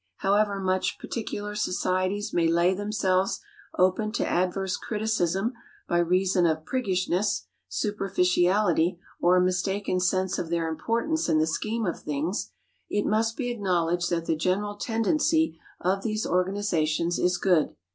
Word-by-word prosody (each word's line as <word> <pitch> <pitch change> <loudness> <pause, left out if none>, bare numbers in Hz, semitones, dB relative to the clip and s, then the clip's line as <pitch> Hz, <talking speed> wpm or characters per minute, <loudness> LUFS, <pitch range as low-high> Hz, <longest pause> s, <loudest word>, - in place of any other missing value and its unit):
However 200 0 +2
much 185 -1 0
particular 210 -2 -5
societies 185 +1 -1
may 170 -1 +3
lay 170 +2 +3
themselves 195 -2 0 0.4
open 185 +4 +2
to - - 0
adverse 185 +1 0
criticism 215 -1 -1 0.3
by 175 - +2
reason 180 +1 +2
of 160 -1 -1
priggishness, 185 - 0 0.2
superficiality 180 - +1 0.2
or 175 +1 +5
a - - +5
mistaken 185 +1 0
sense 185 +1 +1
of 165 - -4
their 170 -1 0
importance 230 - -1
in 160 - +3
the 155 - +3
scheme 215 +8 -2
of 175 - -2
things, 150 +7 -2 0.4
it 205 - 0
must 225 +1 +1
be 245 -1 -1
acknowledged 175 -5 0
that 170 -1 -1
the 160 - +1
general 190 +6 -1
tendency 230 - +1 0.2
of 190 +2 0
these 215 +1 -2
organizations 175 -3 0
is 180 0 +2
good. 180 -5 +2
185 Hz, 135 wpm, -26 LUFS, 175-210 Hz, 0.4 s, or